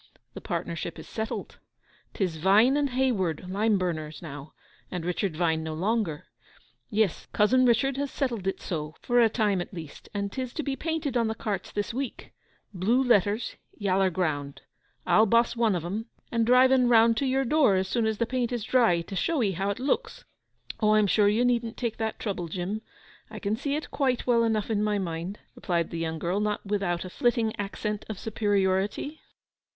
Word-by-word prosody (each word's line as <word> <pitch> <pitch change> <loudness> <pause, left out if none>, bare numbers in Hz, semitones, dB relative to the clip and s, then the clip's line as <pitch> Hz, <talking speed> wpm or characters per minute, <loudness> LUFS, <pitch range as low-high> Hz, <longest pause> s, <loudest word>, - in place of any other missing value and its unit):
'The - - -8
partnership 170 0 -4
is - - -10
settled. 220 0 -5 0.6
'Tis 180 -5 -1
"Vine 205 - +5
and 290 -1 +1
Hayward, 205 -11 0
lime 205 +3 +2
burners," 155 -4 -3
now, 145 -2 -9 0.4
and 180 -2 -4
"Richard 180 -1 -1
Vine" 160 -2 +1
no 160 0 -4
longer. 190 -3 -1 0.6
Yes, 210 -6 0
Cousin 255 +5 +4
Richard 270 +3 +2
has 280 0 -1
settled 240 -9 -2
it 195 - -1
so, 155 -2 -4
for 245 0 +3
a 230 - +5
time 210 -4 +1
at - - -7
least, 160 -4 -9
and 200 -1 -3
'tis 255 0 -4
to 310 - -3
be 275 -1 -2
painted 320 -3 -2
on 230 -2 +2
the 220 - -2
carts 210 -3 -4
this 205 +2 -3
week—blue 240 -3 -3
letters—yaller 205 -3 +1
ground. 150 -6 -2 0.4
I'll 220 +1 +5
boss 235 +3 +3
one 230 -4 +2
of 170 -2 -3
'em, 210 +6 -4 0.2
and 230 -1 +1
drive 255 +1 +6
en 255 -2 +4
round 230 -1 +6
to 275 - +1
your 265 +1 +1
door 275 -6 +4
as 190 0 0
soon 225 +3 0
as 220 -1 -1
the 235 - +1
paint 250 0 -1
is 240 -3 -2
dry, 225 -9 +3
to 180 +4 -8
show 300 - +1
'ee 200 - +2
how 195 +2 -2
it 200 - -2
looks?' 370 - -2 0.5
'Oh, 215 -1 +4
I - - +5
am 215 - +4
sure 205 +1 +3
you 220 +4 +3
needn't 235 -2 0
take 235 -3 -2
that 220 -1 -2
trouble, 190 -5 -3
Jim; 185 +6 -3 0.5
I - - -8
can 205 0 -1
see 280 +5 -2
it 305 - -5
quite 260 -4 0
well 235 -2 +3
enough 220 -1 0
in 210 -1 +1
my 210 -1 +1
mind,' 175 +1 -4 0.2
replied 170 -3 -1
the 170 - -4
young 160 -1 -2
girl—not 205 +6 -1
without 195 -4 -1
a - - -6
flitting 235 -1 +1
accent 210 +1 -3
of 215 - -4
superiority. 205 +6 0
210 Hz, 190 wpm, -27 LUFS, 185-240 Hz, 0.6 s, drive